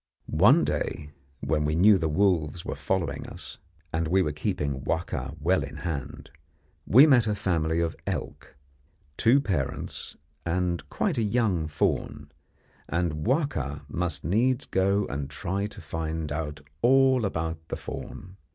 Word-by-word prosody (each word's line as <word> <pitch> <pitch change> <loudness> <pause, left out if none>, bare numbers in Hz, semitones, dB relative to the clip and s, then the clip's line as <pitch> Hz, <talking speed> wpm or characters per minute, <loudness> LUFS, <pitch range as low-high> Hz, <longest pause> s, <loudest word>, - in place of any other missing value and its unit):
One - - +5
day, 75 0 -2 0.3
when 75 -1 0
we 75 +1 0
knew 100 +3 +6
the 80 -2 0
wolves 85 -1 +1
were - - -3
following - - -2
us, - - -6 0.3
and 80 0 0
we 95 +3 +3
were 75 - -1
keeping 75 -4 -2
Wahka 80 -4 -2
well 90 +5 +2
in - - -7
hand, 70 -4 -5 0.6
we 130 +7 +8
met 125 -7 +5
a 105 - +1
family 80 -4 0
of 85 -1 -1
elk, - - -5 0.6
two 120 - +5
parents 90 - -3 0.3
and 85 -3 -1
quite 165 - 0
a - - +2
young 105 -7 +1
fawn, 75 -1 -1 0.6
and 85 -2 -1
Wahka 75 - -1
must 85 +3 -2
needs 120 - +1
go 100 +1 +1
and 70 0 -4
try 95 +6 -2
to 105 - -11
find 80 -1 -4
out 75 0 -4 0.2
all 130 0 +5
about 80 -4 -2
the - - -4
fawn. 95 +1 -8
85 Hz, 145 wpm, -27 LUFS, 75-100 Hz, 0.6 s, we